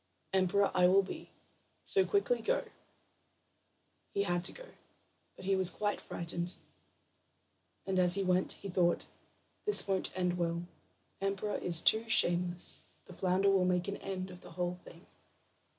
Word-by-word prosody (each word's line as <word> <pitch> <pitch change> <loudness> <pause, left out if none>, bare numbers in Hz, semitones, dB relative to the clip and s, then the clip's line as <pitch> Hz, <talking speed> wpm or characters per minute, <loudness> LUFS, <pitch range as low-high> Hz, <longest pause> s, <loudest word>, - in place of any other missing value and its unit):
Emperor 190 +1 +2
I 180 -1 +4
will 195 +2 +4
be, 190 - -8 0.5
so 390 -2 +2
quickly 420 +6 0
go." - - -1 1.5
He 200 - +1
had 175 -2 -1
to - - +2
go, - - -12 0.7
but 185 - -12
he 195 0 +2
was 190 -2 +3
quite 205 +2 -3
frightened. 175 +1 -4 1.3
And 190 -1 -1
as 180 0 +5
he 200 - 0
went, 185 0 +1
he - - -9
thought: 175 -2 +1 0.6
"This 420 - +6
won't 190 -1 -1
end 180 -1 -1
well; 170 0 -1 0.6
emperor 195 +1 -2
is 170 -2 +5
too 220 +1 +3
shameless. 175 -3 +3 0.2
The - - -13
flounder 190 +2 +1
will 190 -2 +3
make 180 -1 0
an 200 - -4
end 190 -1 -6
of 180 0 -13
the - - -13
whole 180 0 -3
thing." 170 +2 -15
185 Hz, 150 wpm, -32 LUFS, 175-195 Hz, 1.5 s, This